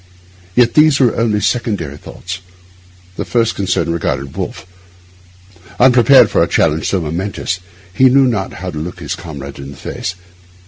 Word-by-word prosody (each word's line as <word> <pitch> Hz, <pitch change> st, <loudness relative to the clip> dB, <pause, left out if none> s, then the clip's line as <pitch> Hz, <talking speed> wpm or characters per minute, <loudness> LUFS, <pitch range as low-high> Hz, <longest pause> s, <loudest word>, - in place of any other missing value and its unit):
Yet 120 Hz, -1 st, +4 dB
these 155 Hz, -2 st, +5 dB
were 125 Hz, -4 st, +3 dB
only 110 Hz, -2 st, +1 dB
secondary 100 Hz, -, -1 dB
thoughts. 90 Hz, +4 st, -8 dB, 0.8 s
His -, -, -4 dB
first 115 Hz, -2 st, +2 dB
concern 90 Hz, -4 st, -1 dB
regarded 70 Hz, -4 st, -3 dB
Wolfe. -, -, -5 dB, 1.1 s
Unprepared 130 Hz, +2 st, +6 dB
for -, -, +2 dB
a -, -, +3 dB
challenge 80 Hz, -1 st, +1 dB
so 95 Hz, -, +1 dB
momentous, 90 Hz, +3 st, -3 dB, 0.3 s
he 130 Hz, +7 st, +5 dB
knew 135 Hz, +1 st, +5 dB
not 105 Hz, -6 st, -1 dB
how 90 Hz, 0 st, -6 dB
to 75 Hz, -, -5 dB
look 85 Hz, +3 st, -6 dB
his -, -, -4 dB
comrade 70 Hz, -4 st, -8 dB
in 70 Hz, 0 st, -8 dB
the 70 Hz, -, -11 dB
face. 90 Hz, +5 st, -5 dB
95 Hz, 155 wpm, -16 LUFS, 80-120 Hz, 1.1 s, Unprepared